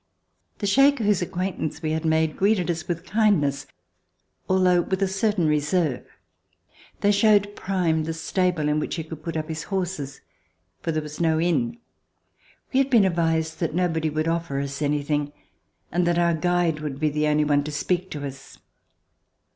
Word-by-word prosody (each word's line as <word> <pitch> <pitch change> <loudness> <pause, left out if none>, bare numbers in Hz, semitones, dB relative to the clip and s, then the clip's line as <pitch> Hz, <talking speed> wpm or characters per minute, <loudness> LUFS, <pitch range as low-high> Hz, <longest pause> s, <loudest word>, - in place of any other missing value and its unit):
The 205 - -3
Shaker, 275 +4 +4
whose 205 -2 +2
acquaintance 175 -3 -3
we 155 - 0
had 160 +1 -2
made, 160 -1 +2
greeted 195 -3 +2
us 165 -1 -5
with 170 -1 -3
kindness, 195 -11 +1 0.8
although 185 -1 +4
with 190 +3 -1
a - - +2
certain 195 -1 0
reserve. 150 -1 +1 1.0
They 205 - +4
showed 205 0 +3
Prime 170 -5 0
the 165 - -2
stable 175 -2 0
in 150 0 +1
which - - -3
he 165 - -3
could 160 -1 -9
put 165 0 -4
up 155 0 -3
his 160 -1 -4
horses, 180 -8 -3 0.6
for 165 - -2
there 155 -1 -1
was 150 +2 -7
no 160 -1 +2
inn. 230 +8 0 1.0
We 260 - +4
had 275 0 +2
been 230 -6 +5
advised 165 -3 0
that 165 -2 -2
nobody 165 -3 0
would 155 +1 -1
offer 165 -4 -1
us 140 +1 -4
any 145 0 0
thing, 145 0 -1 0.6
and 175 +1 +1
that 175 0 +2
our 170 0 +3
guide 170 -1 +1
would 145 -3 -5
be 155 0 +2
the 150 +1 0
only 150 0 +2
one 145 -1 +2
to 150 - -4
speak 180 +5 -1
to 145 -4 -5
us. 135 -1 -9
165 Hz, 180 wpm, -24 LUFS, 150-185 Hz, 1.0 s, been